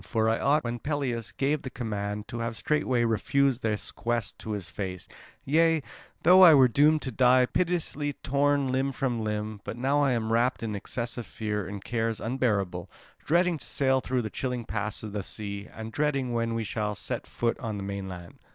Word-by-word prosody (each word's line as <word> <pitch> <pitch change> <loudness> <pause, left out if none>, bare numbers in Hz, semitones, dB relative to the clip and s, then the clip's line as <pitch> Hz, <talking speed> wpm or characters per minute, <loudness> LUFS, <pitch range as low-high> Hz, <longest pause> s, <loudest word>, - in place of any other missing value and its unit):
For 110 -1 0
I 115 0 +2
ought, 145 +2 +3
when 120 0 -3
Pelias 130 -6 -2
gave 145 +2 0
the 130 - -6
command, 105 -4 -4
to 120 - -5
have 115 0 -2
straightway 125 -1 +1
refused 130 +3 +1
this 105 -2 -2
quest 120 -2 -2
to 110 - -4
his 100 -4 -4
face, 95 -2 -5 0.4
yea, 160 +1 +3 0.4
though 180 +3 +8
I 170 -4 +10
were 130 -2 +7
doomed 150 +5 +4
to 130 - -3
die 125 +1 +5
pitilessly, 155 -2 -1
torn 140 0 +2
limb 135 +1 0
from 125 -4 -1
limb, 105 -1 -3
but 115 - -6
now 135 +4 +2
I 135 -2 +3
am 115 -1 -1
wrapped 120 +1 +1
in 110 -2 -2
excessive 120 +3 -4
fear 105 -3 -3
and 100 0 -7
cares 115 -2 -1
unbearable, 105 -8 -1 0.3
dreading 170 0 +2
to - - -6
sail 130 -1 +1
through 125 -1 -1
the 110 - -4
chilling 125 -3 -3
paths 105 0 -3
of 105 -2 -6
the 105 - -2
sea, 100 +1 -5
and 110 0 -7
dreading 135 -3 0
when 115 -1 0
we 115 - -1
shall 105 0 -2
set - - -4
foot 115 -1 -1
on 110 -6 -4
the 100 - -5
mainland. 95 -3 -6
120 Hz, 195 wpm, -28 LUFS, 105-135 Hz, 0.4 s, I